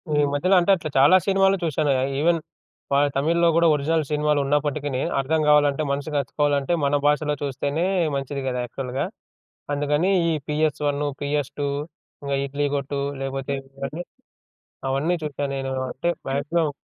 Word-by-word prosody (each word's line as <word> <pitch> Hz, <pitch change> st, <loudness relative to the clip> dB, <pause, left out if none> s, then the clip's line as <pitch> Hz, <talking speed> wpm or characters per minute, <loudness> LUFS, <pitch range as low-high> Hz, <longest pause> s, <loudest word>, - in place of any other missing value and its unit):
ఈ -, -, +3 dB
మధ్యల 180 Hz, +7 st, +2 dB
అంటే 175 Hz, +3 st, +3 dB
అట్లా 160 Hz, -4 st, -5 dB
చాలా 145 Hz, +7 st, +7 dB
సినిమాలు 195 Hz, 0 st, +4 dB
చూసానాయే. 145 Hz, -4 st, +1 dB, 0.2 s
ఇవెన్ 165 Hz, +1 st, +3 dB, 0.5 s
వాళ్ళ 145 Hz, +1 st, +4 dB
తమిళ్‌లో 170 Hz, +4 st, +2 dB
కూడా 170 Hz, 0 st, +5 dB
ఒరిజినల్ 155 Hz, +2 st, +1 dB
సినిమాలున్నప్పటికినీ 145 Hz, -2 st, 0 dB, 0.2 s
అర్థం 155 Hz, +4 st, +1 dB
కావాలంటే 150 Hz, 0 st, +4 dB
మనసుకి 145 Hz, +1 st, -2 dB
అతుక్కోవాలంటే 145 Hz, +2 st, 0 dB
మన 140 Hz, +1 st, +2 dB
భాషలో 150 Hz, 0 st, +2 dB
చూస్తేనే 140 Hz, +5 st, -1 dB, 0.3 s
మంచిది 135 Hz, 0 st, -3 dB
గదా! 125 Hz, -1 st, -1 dB
యాక్చువల్‌గా. 130 Hz, +1 st, -3 dB, 0.7 s
అందుకని 145 Hz, +5 st, +1 dB, 0.2 s
ఈ -, -, +1 dB
పీఎస్ 150 Hz, 0 st, 0 dB
వన్, 145 Hz, +1 st, 0 dB, 0.2 s
పీఎస్ 145 Hz, -1 st, -1 dB
టూ, 145 Hz, -, 0 dB, 0.6 s
ఇంగ 140 Hz, -, -4 dB
ఇడ్లీ 145 Hz, +1 st, -2 dB
కొట్టు 140 Hz, 0 st, -2 dB, 0.2 s
లేకపోతే 135 Hz, +1 st, -3 dB, 0.2 s
ఇవన్నీ 150 Hz, +5 st, -5 dB, 0.9 s
అవన్నీ 155 Hz, +7 st, +1 dB
చూసానేను. 140 Hz, -2 st, -3 dB, 0.2 s
అంటే 170 Hz, -, -3 dB, 0.2 s
వమాక్సిమం 145 Hz, +4 st, 0 dB
145 Hz, 135 wpm, -23 LUFS, 140-155 Hz, 0.9 s, చాలా